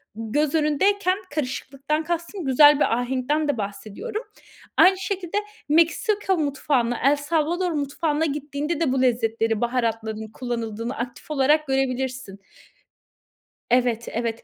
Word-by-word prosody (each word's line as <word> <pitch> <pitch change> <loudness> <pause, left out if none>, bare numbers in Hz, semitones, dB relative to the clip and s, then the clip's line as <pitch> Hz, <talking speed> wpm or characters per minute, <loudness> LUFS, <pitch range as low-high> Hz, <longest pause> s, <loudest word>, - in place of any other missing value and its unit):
göz 275 +8 -1
önündeyken, 370 +6 +2 0.2
karışıklıktan 280 +2 -2
kastım 340 +1 -4
güzel 290 +2 +6
bir - - +2
ahenkten 265 +5 -1
de 285 - 0
bahsediyorum, 215 - -5 0.5
aynı 375 +1 +6
şekilde 380 -1 -3 0.3
Meksika 375 +5 +2
mutfağına, 275 -5 0
El 280 +2 +5
Salvador 330 +4 0
mutfağına 300 +1 -1
gittiğinde 295 +2 -3
de 320 -6 +1
bu 265 - +1
lezzetleri, 225 -3 +1
baharatların 225 -3 -1
kullanıldığını 235 0 -4
aktif 245 +5 -6
olarak 300 +2 +3
görebilirsin. 260 -5 -2 1.3
Evet, 245 -2 +2
evet. 230 0 -3
280 Hz, 110 wpm, -24 LUFS, 240-315 Hz, 1.3 s, güzel